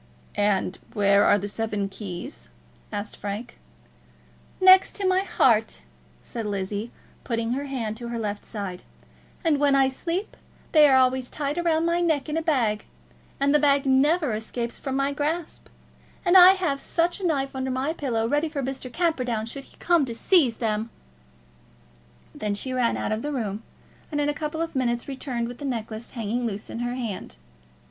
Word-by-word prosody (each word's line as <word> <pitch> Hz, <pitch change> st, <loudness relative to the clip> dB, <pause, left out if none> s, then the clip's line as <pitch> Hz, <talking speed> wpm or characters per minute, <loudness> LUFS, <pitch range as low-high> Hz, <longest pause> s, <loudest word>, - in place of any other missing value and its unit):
"And 200 Hz, -2 st, 0 dB
where 200 Hz, -1 st, +4 dB
are 205 Hz, -, +5 dB
the 205 Hz, 0 st, -4 dB
seven 210 Hz, -1 st, -2 dB
keys?" 200 Hz, -, -7 dB, 0.4 s
asked 205 Hz, 0 st, -4 dB
Frank. 205 Hz, +4 st, -6 dB, 1.0 s
"Next 375 Hz, 0 st, +7 dB
to 395 Hz, -2 st, -1 dB
my 370 Hz, 0 st, +3 dB
heart," 225 Hz, -, +2 dB, 0.4 s
said 225 Hz, -2 st, -5 dB
Lizzie, 200 Hz, +2 st, -3 dB, 0.3 s
putting 230 Hz, -1 st, -2 dB
her 275 Hz, +3 st, -2 dB
hand 235 Hz, -5 st, -4 dB
on 235 Hz, -, -5 dB
her 235 Hz, -, -3 dB
left 210 Hz, -2 st, -3 dB
side. 195 Hz, -4 st, -6 dB, 0.6 s
"And 315 Hz, -4 st, +2 dB
when 285 Hz, -1 st, +4 dB
I 270 Hz, -1 st, +4 dB
sleep 340 Hz, +9 st, -4 dB, 0.4 s
they 305 Hz, -2 st, +7 dB
are 265 Hz, -, +6 dB
always 255 Hz, -1 st, +2 dB
tied 295 Hz, +3 st, -2 dB
round 325 Hz, -1 st, +2 dB
my 340 Hz, +1 st, +1 dB
neck 315 Hz, -5 st, +1 dB
in 300 Hz, -, -3 dB
a 325 Hz, -, +1 dB
bag, 245 Hz, -10 st, +1 dB, 0.5 s
and 280 Hz, +1 st, +3 dB
the 300 Hz, -, +5 dB
bag 280 Hz, -1 st, +3 dB
never 285 Hz, +1 st, +3 dB
escapes 235 Hz, +2 st, -4 dB
from 265 Hz, -1 st, -3 dB
my 275 Hz, +1 st, +1 dB
grasp. 305 Hz, +3 st, -3 dB, 0.6 s
And 355 Hz, +1 st, +4 dB
I 370 Hz, 0 st, +10 dB
have 350 Hz, -8 st, -1 dB
such 345 Hz, +3 st, 0 dB
a -, -, -8 dB
knife 275 Hz, -4 st, -1 dB
under 260 Hz, 0 st, -2 dB
my 260 Hz, +4 st, -1 dB
pillow, 235 Hz, -8 st, -1 dB
ready 295 Hz, +5 st, +1 dB
for 285 Hz, -3 st, -3 dB
Mr. 260 Hz, -1 st, -5 dB
Camperdown 250 Hz, -9 st, 0 dB
should 275 Hz, +4 st, -8 dB
he -, -, -21 dB
come 345 Hz, -3 st, +3 dB
to 235 Hz, -3 st, -5 dB
seize 265 Hz, -, +3 dB
them!" 220 Hz, -1 st, -1 dB, 1.4 s
Then 210 Hz, -1 st, -2 dB
she 255 Hz, +6 st, -3 dB
ran 250 Hz, -2 st, +1 dB
out -, -, -2 dB
of 215 Hz, +1 st, -1 dB
the 295 Hz, -, -3 dB
room, 215 Hz, -6 st, -3 dB, 0.5 s
and 295 Hz, -, -1 dB
in 290 Hz, 0 st, +2 dB
a -, -, +1 dB
couple 305 Hz, +2 st, -4 dB
of 330 Hz, -, -6 dB
minutes 240 Hz, -2 st, 0 dB
returned 260 Hz, -4 st, -3 dB
with 245 Hz, 0 st, -9 dB
the -, -, -8 dB
necklace 225 Hz, -3 st, -4 dB
hanging 235 Hz, +1 st, -2 dB
loose 205 Hz, -1 st, -5 dB
in 230 Hz, -, -5 dB
her 245 Hz, +1 st, -2 dB
hand. 230 Hz, -7 st, -5 dB
260 Hz, 180 wpm, -25 LUFS, 220-295 Hz, 1.4 s, I